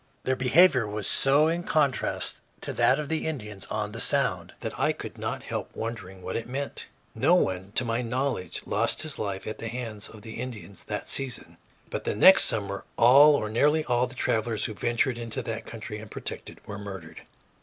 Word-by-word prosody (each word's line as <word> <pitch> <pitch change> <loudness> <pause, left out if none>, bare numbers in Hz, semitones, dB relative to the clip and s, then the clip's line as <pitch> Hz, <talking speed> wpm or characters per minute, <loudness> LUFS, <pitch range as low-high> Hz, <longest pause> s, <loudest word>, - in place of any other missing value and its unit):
Their 130 - +1
behavior 130 -1 +4
was 105 -1 -4
so 140 +3 +5
in 170 +2 0
contrast 150 -6 0 0.2
to - - -4
that 130 - +3
of 150 -1 -4
the 160 +1 -2
Indians 105 -10 -6
on 105 -1 -3
the 115 - -7
Sound - - +1
that - - -4
I - - +2
could - - -9
not - - -4
help - - -4
wondering 105 -5 -6
what - - -4
it 115 - -4
meant. 140 +2 -4 0.3
No - - +3
one, 95 +1 0
to 125 - +1
my 115 +1 -1
knowledge, 125 -6 -2
lost - - 0
his 155 -2 -4
life 100 -2 -3
at 110 - -6
the 115 - -5
hands 115 -3 -5
of 110 -2 -13
the 110 0 -8
Indians 110 -6 -8
that - - -4
season, 135 -3 0 0.3
but - - -3
the - - -2
next 190 - +8
summer 100 -2 0
all 140 +5 +7
or 110 - -1
nearly 150 +8 +2
all 125 0 +1
the 130 - -12
travelers 110 -3 0
who 110 - -3
ventured 120 +3 0
into 115 -2 -2
that 115 0 -5
country 110 -2 -7
unprotected 110 - -8
were 100 0 -7
murdered. 95 -6 -8
115 Hz, 195 wpm, -27 LUFS, 105-135 Hz, 0.3 s, next